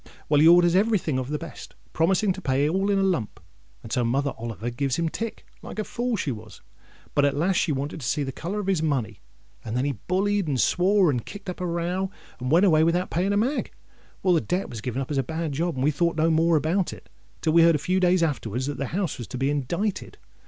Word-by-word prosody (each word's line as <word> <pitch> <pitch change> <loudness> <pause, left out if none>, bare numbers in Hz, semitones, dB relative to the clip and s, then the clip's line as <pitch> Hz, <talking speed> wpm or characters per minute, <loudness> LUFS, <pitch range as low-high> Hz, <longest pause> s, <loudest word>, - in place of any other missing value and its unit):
Well, 145 -1 +4
he 160 - +7
orders 175 0 +6
every 215 +3 +4
thing 155 -7 -2
of 130 0 -4
the 150 - -1
best, 165 +1 -10 0.2
promising 190 +4 +2
to 190 - -9
pay 140 -1 +1
all 190 +5 0
in 200 - +2
a 195 - +2
lump; 175 - -1 0.4
and 115 - -10
so 125 - +1
Mother 135 +4 0
Oliver 115 0 -5
gives 130 +1 -1
him 165 +1 0
tick, 225 +6 -5 0.2
like - - -9
a 215 - -1
fool 240 +3 -3
as - - -4
she 145 - -2
was. 110 -2 -10 0.5
But 145 - +3
at 140 0 +2
last 175 +4 +1
she 165 - +1
wanted 145 +3 -3
to 125 - -4
see 145 - 0
the 135 - -3
colour 180 +10 -4
of 205 - -3
his 190 -4 +1
money; 140 - -1 0.4
and 115 +2 -3
then 130 - +1
he 145 - +1 0.2
bullied, 200 0 +1
and 135 -4 0
swore, 185 +1 +3
and 125 -4 -2
kicked 200 -2 -7
up 180 - -10
a 180 - -1
row, 175 +3 -1 0.3
and 125 0 -3
went 170 +7 +5
away 160 -4 +5
without 175 +3 +1
paying 185 +4 +1
a 205 - +2
mag. 255 +8 -1 0.5
Well, 185 - +4
the 165 - +3
debt 180 +2 -2
was 115 -3 -6
given 125 +3 -2
up 135 - -9
as 140 - +1
a - - +1
bad 160 +3 -3
job, 165 +4 -1
and 130 - -2
we 150 - +3
thought 170 +2 0
no 160 +1 +3
more 165 +1 +3
about 165 +5 +1
it, - - -13 0.3
till 155 - +1
we 170 - +7
heard 165 -1 +6
a - - +3
few 180 +6 0
days 180 -1 +3
afterwards 130 -5 -2
that 145 -1 -4
the 140 0 -2
house 185 -10 -2
was 120 - -6
to 130 - -6
be 135 +2 +1
indicted. 170 +9 -2
160 Hz, 260 wpm, -25 LUFS, 135-185 Hz, 0.5 s, he